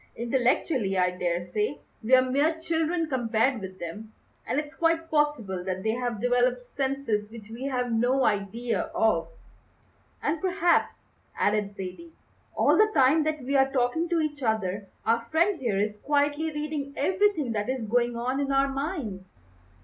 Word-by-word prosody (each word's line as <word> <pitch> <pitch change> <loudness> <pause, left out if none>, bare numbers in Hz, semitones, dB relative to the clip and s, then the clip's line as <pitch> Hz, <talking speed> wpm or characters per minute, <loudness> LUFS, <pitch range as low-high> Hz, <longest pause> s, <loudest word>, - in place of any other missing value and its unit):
Intellectually, 240 - +1
I 180 0 +3
daresay, 180 +8 -2 0.2
we're 255 +3 +5
mere 290 +5 +1
children 325 +1 0
compared 240 -2 +1
with 190 -1 -8
them, 210 +6 -8 0.3
and 275 - +1
it's 300 0 -6
quite 330 0 0
possible 295 - 0
that 185 0 -3
they 220 - +1
have 240 -2 -2
developed 245 +1 +1
senses 265 -7 -2
which 220 -1 -11
we 240 +4 -6
have 250 -3 -1
no 245 +4 +2
idea 215 +4 -1
of." 220 -1 +2 1.0
"And 305 +1 0
perhaps," 365 -2 +1 0.3
added 205 -1 0
Zaidie, 200 - -8 0.4
"all - - +4
the 430 0 +6
time 275 +3 +5
that 310 -3 -2
we 275 +3 -1
are 270 0 +4
talking 270 +6 0
to 340 -1 +2
each 295 -2 -3
other 205 -4 -1 0.2
our 230 +1 +2
friend 335 +8 +1
here 230 -6 -1
is 210 +1 -1
quietly 290 +3 +1
reading 295 -2 -4
everything 365 - +1
that 210 +1 -2
is 260 -3 -2
going 240 +2 +1
on 255 +3 -1
in 280 -1 -1
our 275 0 +3
minds." 235 - -5
250 Hz, 155 wpm, -27 LUFS, 215-295 Hz, 1.0 s, the